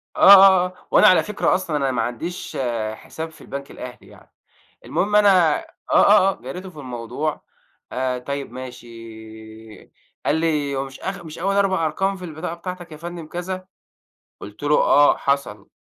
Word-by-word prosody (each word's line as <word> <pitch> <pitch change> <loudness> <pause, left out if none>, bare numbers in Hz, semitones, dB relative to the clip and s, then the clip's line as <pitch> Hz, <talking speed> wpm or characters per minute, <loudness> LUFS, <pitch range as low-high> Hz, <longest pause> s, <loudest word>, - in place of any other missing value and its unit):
آه، - - -7
آه، 190 -2 +8
آه 180 - -6 0.2
وأنا - - +6
على 185 - +5
فكرة 210 -1 0
أصلًا 170 -5 -2
أنا 135 -2 0
ما 120 -2 -1
عنديش 125 +10 -5 0.4
حساب 160 +8 -8
في - - -18
البنك 140 0 -8
الأهلي 125 -1 -10
يعني، - - -19 0.5
المهم 205 +2 -1
أنا 185 -7 +5
آه، - - -17 0.3
آه، 200 -1 +6
آه - - -12
جاريته 180 +10 -7
في 155 -5 -13
الموضوع، 130 +4 -4 0.5
آآ، 130 0 -1
طيب 140 0 -5
ماشي 125 -1 -9 1.4
قال 150 - +2
لي: 150 -3 0
"هو 135 0 -2
مش 135 0 -12
آخ 190 -2 -6
مش 155 0 -9
أول 195 +2 0
4 190 -4 +2
أرقام 195 +5 -1
في 185 - -8
البطاقة 165 +1 -6
بتاعتك 175 -1 -8
يا 155 - -9
فندم 170 0 -8
كذا؟"، 185 +2 -6 0.7
قلت 105 +7 -11
له: 150 +1 +3
"آه 145 0 +4
حصل"، 140 -8 -2
160 Hz, 170 wpm, -21 LUFS, 135-185 Hz, 1.4 s, آه